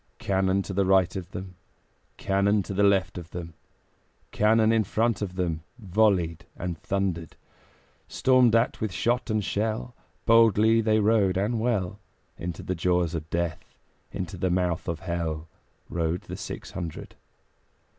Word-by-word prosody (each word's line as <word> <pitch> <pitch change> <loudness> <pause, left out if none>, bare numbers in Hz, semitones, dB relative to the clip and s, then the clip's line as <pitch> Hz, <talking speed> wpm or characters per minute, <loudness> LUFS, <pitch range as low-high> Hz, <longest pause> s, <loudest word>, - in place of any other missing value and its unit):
Cannon 95 0 +1
to 95 - -6
right 95 -2 +3
of 95 -2 -5
them, 95 -1 -8 0.6
Cannon 100 +1 +2
to 100 - -6
left 100 -2 +2
of 85 -1 -11
them, 85 -2 -7 0.8
Cannon 110 +1 +4
in 115 -1 +3
front 110 +1 0
of 95 -3 -4
them 85 -4 -1 0.2
Volleyed 95 -6 +1
and 90 -1 -3
thundered. 95 -5 -2 0.7
Stormed 130 -3 +4
at 115 +1 +1
with 110 -2 -1
shot 120 +6 0
and 110 -1 +1
shell, 95 - -2 0.3
Boldly 115 0 +5
they 110 0 +2
rode 105 -3 +3
and 110 +4 0
well; 105 -5 -1 0.4
Into 85 0 -6
the 95 - -2
jaws 90 -1 +1
of 80 -1 -5
Death, 85 -2 -3 0.4
Into 95 -1 -5
the 95 +2 0
mouth 90 -1 0
of 85 -2 -3
Hell, 85 -3 -3 0.4
Rode 85 +1 -1
the - - -8
six - - -7
hundred. 85 -4 -6
95 Hz, 145 wpm, -26 LUFS, 85-110 Hz, 0.8 s, Boldly